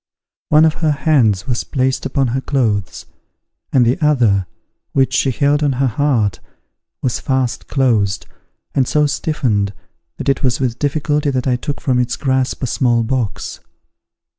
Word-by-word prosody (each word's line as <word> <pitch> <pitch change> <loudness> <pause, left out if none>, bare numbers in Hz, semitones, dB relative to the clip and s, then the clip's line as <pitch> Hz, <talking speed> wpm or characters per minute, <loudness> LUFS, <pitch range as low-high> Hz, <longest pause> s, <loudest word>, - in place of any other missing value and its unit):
One 155 +1 +6
of 160 - +3
her 160 - +2
hands 125 - +2
was 125 -3 -1
placed 130 -1 -1
upon 135 -4 0
her 130 +3 -1
clothes: 110 - -1 0.7
and 125 -3 +4
the 125 +8 +1
other, 115 -11 +3 0.5
which 135 -1 +2
she 135 - +2
held 145 +3 +1
on 145 -2 +2
her 135 +2 0
heart, 120 -5 +1 0.6
was 125 -2 0
fast 130 -3 -1
closed, 110 -8 +1 0.5
and 130 -2 +2
so 150 0 +2
stiffened, 125 -9 -1 0.4
that - - -6
it 135 -1 +1
was 125 -3 +1
with 125 -3 -1
difficulty 145 0 0
that 130 -2 -1
I 130 -2 +2
took 140 +3 -4
from 125 -2 +1
its 125 0 0
grasp 130 -1 -1
a - - +2
small 120 -2 +1
box. 120 -2 -3
130 Hz, 160 wpm, -17 LUFS, 120-140 Hz, 0.7 s, One